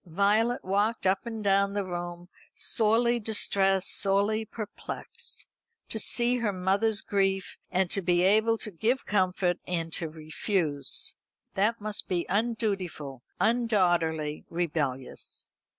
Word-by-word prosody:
Violet 205 +7 +2
walked 205 +3 0
up 190 +4 +1
and 225 -2 -5
down 200 0 +2
the 200 -1 -1
room, 175 -1 -5 0.3
sorely 235 +2 +2
distressed, 195 -3 +1
sorely 205 +3 +2
perplexed. 215 -1 -7 0.4
To 220 - -1
see 240 +2 +3
her 230 -4 0
mother's 200 +4 +1
grief, 195 -1 0
and 190 0 +1
to 195 - +1
be 175 -1 +2
able 220 +4 +4
to 215 - -3
give 225 +9 0
comfort, 185 -3 +1
and 165 -2 -2
to 165 - -2
refuse. 155 0 0 0.4
That 215 +4 +1
must 215 0 -1
be 175 -2 -1
undutiful, 195 - -1 0.2
undaughterly, 175 -10 +1
rebellious. 150 -7 -3
195 Hz, 120 wpm, -28 LUFS, 175-220 Hz, 0.4 s, able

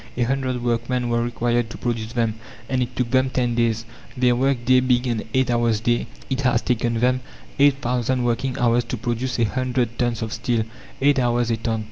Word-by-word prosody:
A 120 - +2
hundred 130 -1 -1
workmen 120 +1 0
were 120 0 +1
required 120 0 0
to - - -8
produce 115 -2 -3
them, 115 -3 +1 0.3
and 130 -1 0
it 125 0 -3
took 125 -2 -1
them 130 0 +3
ten 125 -2 0
days. 115 -1 0 0.3
Their 125 -1 +3
work 130 -1 0
day 130 0 +6
being 125 -1 +2
an 120 -3 -1
eight 130 0 +2
hours 120 -2 +2
day, 120 +1 0 0.2
it 135 0 -1
has 125 -3 +2
taken 120 -1 0
them 125 +2 +2 0.4
eight 140 -1 +6
thousand 125 +1 0
working 120 +2 -1
hours 120 0 +3
to 120 - -4
produce 120 +2 -2
a 120 - +2
hundred 125 0 -1
tons 120 -2 0
of 110 0 -4
steel 115 -1 0 0.4
eight 140 0 +4
hours 120 -1 +1
a 115 - +1
ton." 110 0 -2
120 Hz, 205 wpm, -22 LUFS, 115-125 Hz, 0.4 s, day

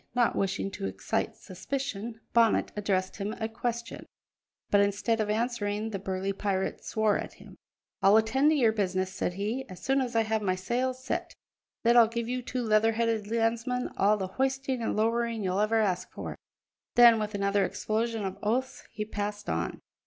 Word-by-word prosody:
Not 240 -1 +3
wishing 195 0 -1
to 95 - -4
excite 95 - -2
suspicion, 225 +2 -5
Bonnet 230 -2 +3
addressed 190 -2 -1
him 205 +1 -3
a 220 - -3
question, 235 +1 -4 0.6
but 205 - +5
instead 205 +3 +1
of 210 - -1
answering 220 -1 -1
the 195 - -3
burly 190 +1 -2
pirate 195 -1 -2
swore 220 -1 +1
at - - -6
him. - - -14 0.5
"I'll 200 +2 +6
attend 250 +7 +3
to 310 - +3
your 240 -6 +4
business," 190 -3 -1
said 180 - -2
he, 215 +7 -2
"as 185 - -9
soon 270 +1 +2
as 245 -2 -3
I 225 - +5
have 220 0 0
my 185 -3 +1
sails 250 +7 -2
set; 255 - -3 0.5
then 235 0 +4
I'll 230 -1 +8
give 230 0 -3
you 250 +1 -2
two 250 +1 -3
leather 220 0 +3
headed 225 -2 0
landsmen 235 +2 0
all 205 +2 +3
the 190 - -2
hoisting 265 +4 -1
and 225 - -1
lowering 230 0 +1
you'll 185 +1 0
ever 215 +2 +2
ask 185 -4 0
for." - - -6 0.6
Then 235 -2 +8
with 210 0 -3
another 200 0 +2
explosion 215 +3 -1
of 190 - -5
oaths 250 +5 -1
he 210 - -4
passed 205 0 -4
on. 80 +1 -2
220 Hz, 180 wpm, -29 LUFS, 200-235 Hz, 0.6 s, I'll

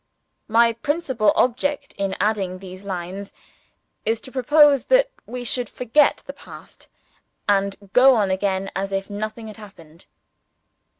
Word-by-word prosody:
My 230 +1 +4
principal 260 -3 0
object 280 +3 0
in 195 -1 -3
adding 200 -3 0
these 185 0 -10
lines 190 +1 -6 0.7
is 225 0 0
to 260 - -11
propose 280 +2 +4
that - - +3 0.2
we 250 0 -6
should 245 -1 -2
forget 250 +5 +2
the - - -7
past, - - -14 0.6
and 200 -1 +2 0.2
go 260 +1 +7
on 205 -4 +1
again 190 0 -1
as 195 +1 -3
if 195 +1 -3
nothing 215 +2 -5
had 215 0 -10
happened. 170 -6 -15
215 Hz, 135 wpm, -22 LUFS, 195-250 Hz, 0.7 s, go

